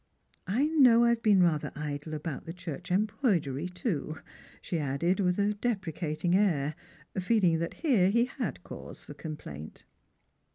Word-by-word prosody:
I 235 +10 +2
know 260 -7 +6
I 235 - +5
have 235 -1 +1
been 200 -5 +5
rather 160 -4 +1
idle 150 +1 -4
about 150 -1 -5
the 165 - -5
church 175 0 -7
embroidery, 185 - 0
too,'' 175 - -3 0.4
she 170 - -3
added 150 +7 0
with 180 -2 +2
a 205 +1 +2
deprecating 175 -7 -2
air, 160 -8 +2 0.5
feeling 185 -4 +3
that 170 0 -3
here 210 - +4
lie 235 +2 +4 0.2
had 140 - -3
cause - - -9
for - - -10
com 155 -2 -6
plaint. 75 - -9
180 Hz, 155 wpm, -29 LUFS, 155-210 Hz, 0.5 s, know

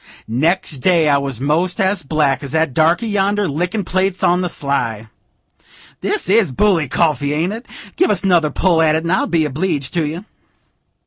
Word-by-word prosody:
Next 150 +5 0
day 170 +1 +2
I 140 -1 +3
was 135 -4 -4
most 165 +6 0
as 190 0 +1
black 145 -1 0
as 140 -1 -6
that 160 -4 +1
darkey 165 - +2
yonder, 205 -1 0
lickin' 180 +8 -2
plates 185 +1 -1
on 180 +1 +3
the 180 - -2
sly. 120 -8 -3 0.9
This 420 - -2
is 200 -5 +3
bully 170 +1 +2
coffee, 145 -1 0
ain't 165 +6 -1
it? 230 +3 -9 0.3
Give 365 - +3
us 200 - 0
another 175 -5 +3
pull 170 +1 +1
at 155 -1 +3
it, 160 - -1
and 170 - -2
I'll 190 - +1
be 165 -2 +1
obleeged 150 -1 -2
to 165 -4 0
you." 165 +7 -6
165 Hz, 185 wpm, -17 LUFS, 145-185 Hz, 0.9 s, I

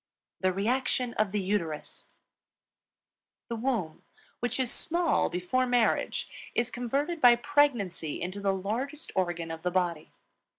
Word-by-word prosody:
THE 185 0 +2
REACTION 245 +5 0
OF 215 -2 0
THE 210 - 0
UTERUS. 175 -6 -3 1.4
The 235 - -2
womb, 225 -9 -2 0.4
which 245 +2 -2
is 255 -2 +3
small 340 0 +2
before 180 +9 0
marriage, 245 -2 +1 0.3
is 240 +1 0
converted 275 +8 -2
by 245 -1 +8
pregnancy 240 - +1
into 185 +3 -4
the 200 -1 +1
largest 230 +11 -3
organ 175 -3 -1
of 165 0 -6
the 180 - 0
body. 175 - -1
220 Hz, 130 wpm, -29 LUFS, 180-255 Hz, 1.4 s, by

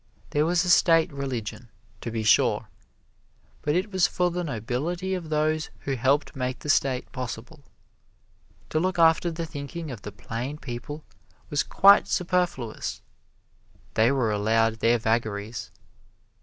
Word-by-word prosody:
There 150 +2 +2
was 175 +1 +2
a - - -1
State 165 -2 +5
Religion, 125 -4 -5 0.3
to - - -4
be 115 -1 -3
sure, 105 - +3 0.9
but 150 +1 0
it 190 +4 0
was 185 -2 +3
for 180 -1 0
the 175 +1 -2
nobility 155 - -2
or - - -2
those 155 -1 -1
who 135 - -2
helped 135 +6 +1
make 130 -1 -2
the 150 - +1
State 130 -2 0
possible. 130 +3 -7 1.1
To 155 - +2
look 185 +2 0
after 165 +1 +4
the 165 0 -4
thinking 155 +1 -6
of 115 -5 -8
the 105 - -7
plain 125 +8 -5
people 145 +3 -7 0.5
was 145 - +2
quite 200 +1 +6
superfluous 175 - -1 0.9
they 115 +3 +4
were 125 -5 +1
allowed 110 +2 +2
their 115 +2 +4
vagaries. 110 -1 -2
140 Hz, 140 wpm, -26 LUFS, 115-165 Hz, 1.1 s, quite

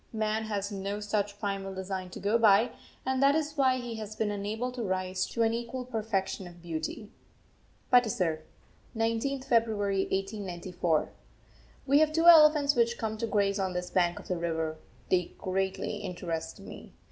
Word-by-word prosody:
Man 220 0 -1
has 205 -1 -3
no 200 +1 -3
such 205 -1 -2
primal 195 -2 -3
design 190 -1 -4
to - - -9
go 215 +3 +2
by, 220 +1 +5 0.3
and 260 0 0
that 280 +1 +5
is 305 -1 -1
why 260 -3 +3
he 240 -2 -5
has 215 -1 -6
been 215 -1 -1
unable 215 +5 -3
to 250 -1 -6
rise 185 -2 -1
to 230 - 0
an 225 0 +2
equal 240 +2 -4
perfection 210 -5 -2
of 175 0 -13
beauty. 170 +6 -5 0.8
PATISAR, 190 -10 +3 0.6
19th 230 +4 -1
February 215 -4 +1
1894. 185 -4 -1 0.7
We 280 +1 +5
have 310 0 +4
two 330 +2 +1
elephants 305 -4 +8
which 235 0 +2
come 220 -1 -2
to 230 - -1
graze 200 -1 +1
on 190 -1 -1
this 180 0 -4
bank 175 -2 +2
of - - -10
the 180 - -1
river. 160 -2 -2 0.3
They 180 -2 +1
greatly 190 +2 -2
interest 175 -4 -5
me. - - -11
205 Hz, 165 wpm, -29 LUFS, 185-235 Hz, 0.8 s, elephants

